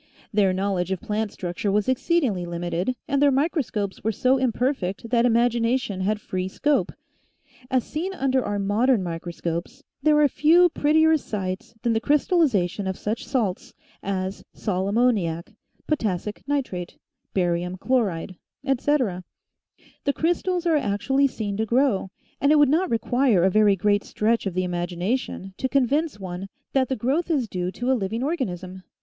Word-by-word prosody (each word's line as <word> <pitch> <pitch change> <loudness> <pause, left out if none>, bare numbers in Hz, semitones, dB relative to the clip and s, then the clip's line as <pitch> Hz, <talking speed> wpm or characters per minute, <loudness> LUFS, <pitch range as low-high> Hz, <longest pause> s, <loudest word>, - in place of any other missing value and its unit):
Their 200 -2 +3
knowledge 190 -1 -1
of 190 - -1
plant 210 +2 -2
structure 180 +3 -3
was 205 0 +1
exceedingly 260 - +1
limited 175 +6 -2
and 280 0 +1
their 290 - +6
micro 295 +4 +1
scopes 205 -6 -4
were 220 - +1
so 255 +5 +2
imperfect 235 -4 -1
that 240 0 +4
imagination 235 -3 +1
had 210 +3 0
free 185 -3 -3
scope. 295 +9 0 0.8
As 255 -2 +2
seen 340 +5 -4
under 265 -3 +1
our 205 - -2
modern 205 +3 +2
microscopes, 170 0 -5 0.2
there 300 -1 +4
are 295 - +6
few 330 +6 +5
pret 300 -1 +1
tier 320 0 +5
sights 200 -3 -5
than 235 - +2
the 225 - +2
crystallization 255 - +2
of 190 - -2
such 215 +2 -3
salts 220 -9 -2 0.3
as 190 0 -3
sal 190 -2 -1
ammoniac, 200 -7 +1 0.3
potassic 210 - -2
nitrate, 250 -12 -3 0.4
barium 180 0 0
chloride, 190 -7 -1 0.3
etc. 260 -8 +1 0.8
The 280 - +2
crys 335 +4 +1
tals 360 -2 -1
are 325 -3 +3
actually 270 +4 +1
seen 205 -6 -4
to 220 - 0
grow 235 -5 +2 0.3
and 280 - +4
it 305 - +6
would 290 -2 +5
not 340 +5 +2
require 230 -3 +2
a 190 - +4
very 210 0 +4
great 205 +2 +1
stretch 225 0 0
of 185 - -4
the 185 - +1
imagination 180 +3 -3
to 260 - -1
convince 275 0 +1
one 185 0 -6 0.3
that 260 -2 +2
the 265 - 0
growth 275 +10 0
Is 280 -8 +1
due 180 -2 -3
to 245 +2 -1
a - - +5
living 225 +1 -2
organism. 190 - -3
220 Hz, 160 wpm, -24 LUFS, 190-270 Hz, 0.8 s, their